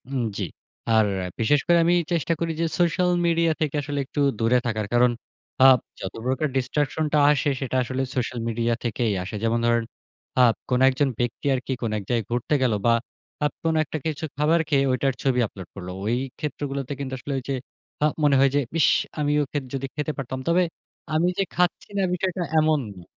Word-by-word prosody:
হুম, 135 -3 -1
জি। 100 - -2 0.5
আর 110 -1 +5 0.3
বিশেষ 130 +6 +3
করে 175 - +5
আমি 175 +1 +4 0.2
চেষ্টা 170 -1 +1
করি 170 -1 -1
যে, - - +2
সোশ্যাল 175 +1 +2 0.2
মিডিয়া 165 -1 +3
থেকে 150 -1 0
আসলে 145 0 -3
একটু 140 - -5 0.2
দূরে 115 +2 +3
থাকার। 110 -2 -1
কারণ 120 0 +5 0.5
আ - - +9 0.3
যত 95 - -5
প্রকার 130 +4 +1
ডিসট্রাকশন 145 +4 0
টা - - +5
আসে, 145 0 +1
সেটা 130 -1 -2
আসলে 130 +2 -3
সোশ্যাল 125 -1 -2
মিডিয়া 115 +1 0
থেকেই 115 -2 0
আসে। 95 - -6
যেমন 115 +1 +2
ধরেন 120 0 +3 0.6
আ - - +7 0.3
কোন 125 -1 +2
একজন 135 +1 +1
ব্যক্তি 120 +2 -2
আরকি 130 +1 -3
কোন 115 -3 -1
এক 105 - -5
জায়গায় 115 -3 0
ঘুরতে 120 +5 0
গেল 125 -3 +2
বা 115 - +5 0.5
আ - - +4 0.2
কোন 165 0 +2
একটা 155 - -5
কিছু 155 -1 -3
খাবার 155 +3 +3
খেয়ে, 140 -3 +3
ঐটার 135 +1 +1
ছবি 130 -2 +2
আপলোড 95 -4 -10
করল। 90 -2 -7 0.2
ওই 115 +3 +1 0.2
ক্ষেত্রগুলোতে 140 -2 -3
কিন্তু 135 -2 -4
আসলে 140 +2 -5
ওই 130 - -4
যে - - +1 0.5
আ - - +6 0.2
মনে 145 -2 +5
হয় 135 0 +5
যে, - - +4 0.2
"ইস - - +5 0.3
আমিও 150 0 +2
খে 145 - 0
যদি 135 0 -2
খেতে 150 +1 -1
পারতাম।" 130 -1 -4
তবে 175 +2 +4 0.5
আমি 160 +3 +3
যে 195 - +3
খাচ্ছি 180 0 0
না 195 - +2
বিষয়টা 185 0 -1 0.2
এমন 155 -1 +3
না। 90 -2 -13
135 Hz, 195 wpm, -24 LUFS, 120-155 Hz, 0.6 s, আ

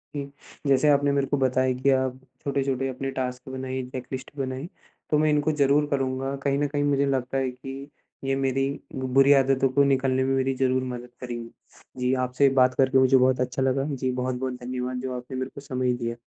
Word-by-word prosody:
हुँ। 140 -1 -4 0.4
जैसे 140 +2 +4
आपने 145 0 +4
मेरे 140 -1 +1
को 145 +1 0
बताया 130 -1 +2
कि 140 - +3
आप 130 -1 0 0.2
छोटे-छोटे 135 -2 -1
अपने 135 +1 -4
टास्क 125 0 -4
बनाइए, 130 0 -4
चेक 130 -1 -6
लिस्ट 130 0 -5
बनाई, 130 +2 -3 0.4
तो 150 - +3
मैं 155 +1 +3
इनको 150 +1 +2
ज़रूर 145 0 +3
करूँगा। 135 0 -1
कहीं 140 -1 +1
न 145 - +1
कहीं 145 0 -1
मुझे 140 -1 +2
लगता 135 -1 -1
है 130 -1 0
कि 135 +2 -9 0.3
ये 135 0 0
मेरी 135 0 0 0.3
बुरी 135 +2 +4
आदतों 135 0 +2
को 140 +2 +3
निकालने 130 -1 +2
में 135 0 +1
मेरी 135 0 +1
ज़रूर 130 0 +1
मदद 120 0 -8
करेंगी। 120 -2 -5 0.5
जी, 125 +1 +1
आपसे 130 +2 +2
बात 130 0 +4
करके 135 0 +3
मुझे 130 0 +5
बहुत 130 0 +3
अच्छा 125 +1 -2
लगा। 135 +1 +1
जी, 130 0 -1
बहुत-बहुत 130 0 -2
धन्यवाद, 125 0 -3
जो 130 0 -4
आपने 125 +1 -7
मेरे 130 +1 -3
को 140 - -8
समय 130 -2 -1
दिया। 115 -1 -3
130 Hz, 200 wpm, -25 LUFS, 130-135 Hz, 0.5 s, मुझे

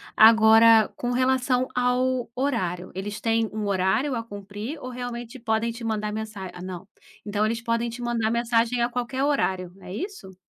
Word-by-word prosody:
Agora, 220 0 +7
com 245 - -2
relação 255 0 +1
ao 250 0 +1
horário, 185 -10 -2
eles 205 +2 -5
têm 225 -1 +1
um 215 -1 -3
horário 195 +9 +1
a 230 - -1
cumprir 205 +5 -7
ou 255 - -6
realmente 245 0 -6
podem 225 0 0
te 230 0 -8
mandar 215 -1 -1
mensa 210 -3 -6
ah, 180 - -10
não. 185 0 -7 0.4
Então, 210 0 0
eles 225 +1 -1
podem 230 0 -1
te 240 +2 -8
mandar 235 -2 0
mensagem 235 +1 +1
a 235 - +2
qualquer 250 +2 -2
horário. 190 -11 0
É 180 - -9
isso? 325 - -7
230 Hz, 170 wpm, -25 LUFS, 210-245 Hz, 0.4 s, Agora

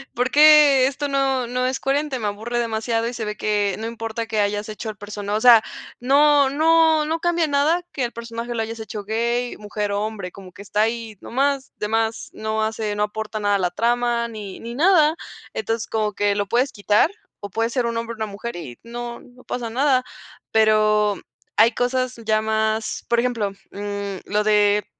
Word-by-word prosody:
¿Por 250 +2 0
qué 295 -3 +7
esto 285 +2 -3
no, 270 -3 0
no 250 +1 -1
es 260 +1 -1
coherente?". 275 -1 -1
Me 210 - -2
aburre 225 +4 -3
demasiado 225 0 -1
y 245 - -4
se 230 -1 -4
ve 210 0 -4
que 205 -2 0
no 225 - -4
importa 225 0 -4
que 215 -1 0
hayas 205 +1 -1
hecho 215 +1 -6
el 210 - -7
persona 205 0 -5
o 220 - -1
sea, 235 -3 +8 0.4
no 285 +1 +5
no 320 +1 +4
no 320 +2 -1
cambia 345 -2 +1
nada 300 +5 +2
que 265 - -2
el 235 - -2
personaje 235 0 -6
lo 225 - -1
hayas 225 +1 -5
hecho 210 -1 -7
gay, 235 +3 -1
mujer 210 -1 -3
o 205 - 0
hombre, 210 -5 -5
como 190 -2 -12
que - - -13
está 205 +1 -1
ahí 225 -2 -3
nomás, 275 +2 -1
de 210 - -2
más, 225 +1 -1
no 220 0 -2
hace, 215 -1 -2
no 210 - +2
aporta 215 +1 -4
nada 205 -1 +2
a 200 - +1
la 180 -1 0
trama 235 +2 +1
ni 210 -4 -8
ni 235 +1 -7
nada. 320 -1 +4 0.4
Entonces 225 +1 -2
como 215 -1 -1
que 205 0 +1
lo 205 -1 -1
puedes 250 +6 +1
quitar, 210 +8 +3 0.3
o 205 - -7
puede 225 +3 -1
ser 245 0 -1
un 230 0 -2
hombre 230 0 -3
o - - -19
una 220 - -2
mujer 210 +3 -7
y 130 -8 -8
no, 235 0 -7
no 250 0 -18
pasa 235 -2 -4
nada. 260 +1 +2 0.5
Pero 215 -1 +3 0.4
hay 230 +2 +6
cosas 255 +1 -1
ya 215 0 +2
más, 220 0 -1
por 235 0 +3
ejemplo, 230 -5 0 0.2
mm, 200 -1 -4
lo 210 +1 0
de 210 -1 +3
225 Hz, 205 wpm, -22 LUFS, 210-250 Hz, 0.5 s, sea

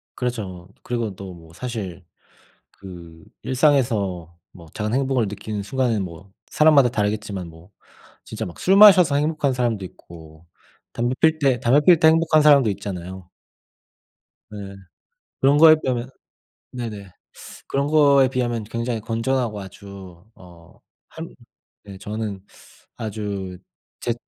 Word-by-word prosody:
그렇죠. 100 -8 -5
그리고 115 -5 -3
또 95 -1 -9
뭐 80 -1 -16
사실 95 -5 -6 0.7
그 85 -4 -13 0.2
일상에서 110 - 0 0.2
뭐 85 -4 -15
작은 110 +1 -3
행복을 130 -4 0
느끼는 105 0 -6
순간은 120 -3 -1
뭐 90 +2 -10 0.2
사람마다 150 -5 +4
다르겠지만 105 -4 -3
뭐 80 +4 -17 0.5
진짜 110 0 -6
막 85 - -10
술 190 - +3
마셔서 185 -8 +7
행복한 150 -2 0
사람도 120 -5 -1
있고 80 -2 -14 0.5
담배 120 +2 -1
필 160 -1 +3
때 135 -4 +2
담배 135 +5 +3
피울 170 0 +6
때 160 - +5
행복한 160 -1 +4
사람도 140 -6 +5
있잖아요. 95 -1 -7 1.2
네. 100 -2 -9 0.6
그런 140 +2 +4
거에 155 0 +8
비하면 125 0 -2 0.6
네네. 105 -6 -7 0.6
그런 140 +1 -1
거에 140 -3 +5
비하면 120 -4 -2
굉장히 115 +1 -3
건전하고 115 -1 -2
아주 95 -2 -12
어 85 -2 -17 0.3
한 - - -8 0.5
네 100 -2 -11
저는 105 -1 -6 0.5
아주 100 -4 -5 0.4
제 120 - -1
110 Hz, 260 characters per minute, -22 LUFS, 95-130 Hz, 1.2 s, 거에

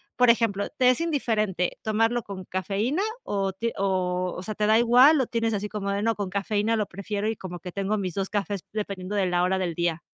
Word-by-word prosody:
por 250 -1 +4
ejemplo, 225 -4 0
¿te 255 -4 +3
es 255 - +2
indiferente 220 - 0
tomarlo 225 +2 +1
con 190 -2 -7
cafeína 205 - -1 0.2
o 195 -1 -1
ti 230 +4 -2
o 185 -2 0
o 180 - -6
sea, 215 - -4
te 210 0 +1
da 220 - +5
igual?, 250 +6 +6
o - - +1
tienes 230 -1 0
así 205 +1 -2
como 200 -1 -3
de, 200 - -1
no 230 - +2
con 200 -2 -3
cafeína, 205 +3 0
lo 215 -2 0
prefiero, 200 +3 -4
y 225 - 0
como 180 -2 -7
que 180 +2 -8
tengo 200 +3 -1
mis 185 -3 -3
dos 195 +1 -2
cafés 205 -2 -2
dependiendo 200 -2 -4
de 195 -2 +2
la 175 0 +1
hora 190 +1 +2
del 180 -3 -1
día. 170 -1 0
205 Hz, 230 wpm, -26 LUFS, 190-225 Hz, 0.2 s, igual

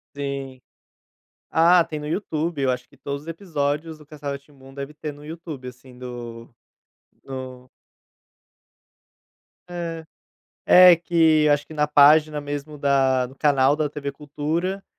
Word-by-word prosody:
Sim, 140 -2 -5 0.9
ah, 170 +1 +5
tem 155 -2 -6
no 150 - -6
YouTube, 160 -3 -2
eu 130 -2 +2
acho 125 0 -6
que - - -22
todos 140 0 -6
os 160 - -14
episódios 160 -2 -3
do 150 - -16
castelo 145 -2 -6
Rá-Tim-Bum, 140 -1 -12
deve 140 +1 -7
ter 150 0 -6
no 145 +1 -14
YouTube, 155 -4 -8
assim, 125 0 -14
do 120 -2 -9 0.7
no 130 -1 -8 2.0
É, 170 -2 -5 0.6
é 180 -1 +8
que 160 -2 +3
eu 150 - +5
acho 145 0 0
que 155 - -11
na 150 -1 +1
página 150 +1 +5
mesmo 145 +1 -6
da 135 -2 +2
do 130 - -15
canal 140 -1 +3
da 150 0 -1
TV 140 -1 -5
Cultura, 160 +7 -3
145 Hz, 145 wpm, -23 LUFS, 135-160 Hz, 2.0 s, é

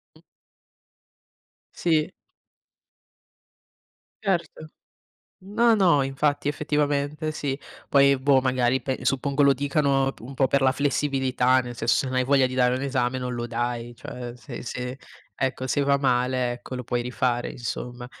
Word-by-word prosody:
Mh. - - -20 1.5
Sì. 160 -1 +1 2.1
Certo. 170 -5 -2 0.8
No, 225 +3 +3
no, 175 -8 +4
infatti, 145 +2 0
effettivamente 150 +1 -1
sì. 140 -3 -3 0.3
Poi 140 0 +5
boh, 135 0 +4
magari, 130 0 +1
pe 135 -2 -3
suppongo 140 +2 +1
lo 140 0 +6
dicano 140 0 +1
un 125 +4 -9
po' 135 0 +2
per 140 - +2
la 130 0 +4
flessibilità, 135 -3 +1
nel 120 -1 -7
senso, 115 0 +1
se - - +1
non 130 - -3
hai 130 0 +2
voglia 135 0 +4
di 130 - -7
dare 125 -1 +3
un 130 - -3
esame, 130 -2 0
non 125 -1 -3
lo 120 0 -3
dai. 120 0 -3
Cioè, 120 0 -8
se 120 0 -9
se 125 +1 -5 0.4
ecco 130 -1 -2
se 145 - +1
va 140 0 +3
male 125 -2 +1
ecco, 120 +1 -7
lo 125 - -5
puoi 120 +1 -1
rifare 125 0 -1
insomma. 120 +1 -6
130 Hz, 150 wpm, -25 LUFS, 125-140 Hz, 2.1 s, lo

